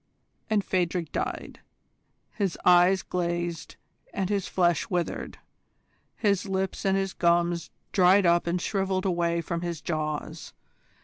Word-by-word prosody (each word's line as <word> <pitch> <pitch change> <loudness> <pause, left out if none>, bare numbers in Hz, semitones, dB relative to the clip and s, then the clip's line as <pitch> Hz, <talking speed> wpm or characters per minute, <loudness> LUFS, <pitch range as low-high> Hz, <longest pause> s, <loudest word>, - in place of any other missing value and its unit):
And 210 -2 +1
Phadrig 175 -3 -1
died. - - -4 0.7
His 195 -5 -2
eyes 180 +1 +5
glazed 175 -2 -3 0.4
and 195 0 -2
his 200 -3 0
flesh 175 -4 +1
withered; 175 -2 -3 0.8
his 200 -2 0
lips 190 0 -2
and 195 0 +3
his 195 -1 -2
gums 170 -1 +1 0.2
dried 185 +1 +5
up 170 0 +3
and 175 +1 0
shrivelled 190 0 -1
away 170 -2 +1
from 170 +1 -4
his 170 -2 -4
jaws. 155 -2 -4
175 Hz, 125 wpm, -27 LUFS, 170-190 Hz, 0.8 s, eyes